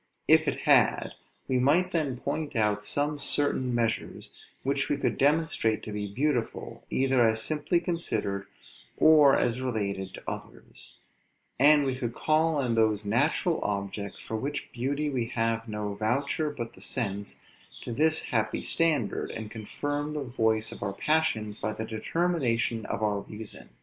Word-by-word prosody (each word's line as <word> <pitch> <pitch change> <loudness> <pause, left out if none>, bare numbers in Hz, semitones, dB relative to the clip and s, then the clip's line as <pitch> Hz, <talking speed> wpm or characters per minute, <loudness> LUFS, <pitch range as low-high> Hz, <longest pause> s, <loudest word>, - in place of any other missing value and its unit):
If - - +5
it - - -1
had, - - +4 0.4
we 130 -1 +1
might 165 +8 +3
then 150 -7 -1
point 145 +3 -3
out 105 -2 +1
some 145 +1 0
certain 140 -2 0
measures 115 -1 -2 0.3
which - - 0
we - - +1
could - - 0
demonstrate 145 -7 +2
to 110 - -6
be 105 0 -3
beautiful, 125 +1 -2
either 130 -2 +3
as 110 -1 +2
simply 155 +3 +1
considered, 165 - -2 0.5
or 150 -3 +7
as 125 +1 0
related 100 -6 -2
to - - -11
others; - - -9 0.6
and 145 +1 +6
we 130 -1 0
could 120 -3 -4
call 155 0 +2
in 125 -3 0
those 110 -2 +2
natural 145 - +2
objects, 100 0 -3
for 110 - -4
whose 145 +4 -2
beauty 140 +5 -1
we 125 -4 -1
have 115 -1 -1
no 105 -1 -3
voucher 135 +9 0
but 120 -5 -6
the - - -14
sense, 100 -5 -3 0.4
to - - -6
this 155 +5 +2
happy 110 -2 -1
standard, 155 -9 +1
and 110 -1 -6
confirm 145 +7 -4
the 150 - -2
voice 110 -3 0
of - - -9
our 100 -1 -2
passions 110 -6 0
by 110 - -2
the 110 - -4
determination 115 -3 0
of 110 - -3
our 105 -1 +1
reason. 105 +2 -9
120 Hz, 155 wpm, -28 LUFS, 110-145 Hz, 0.6 s, or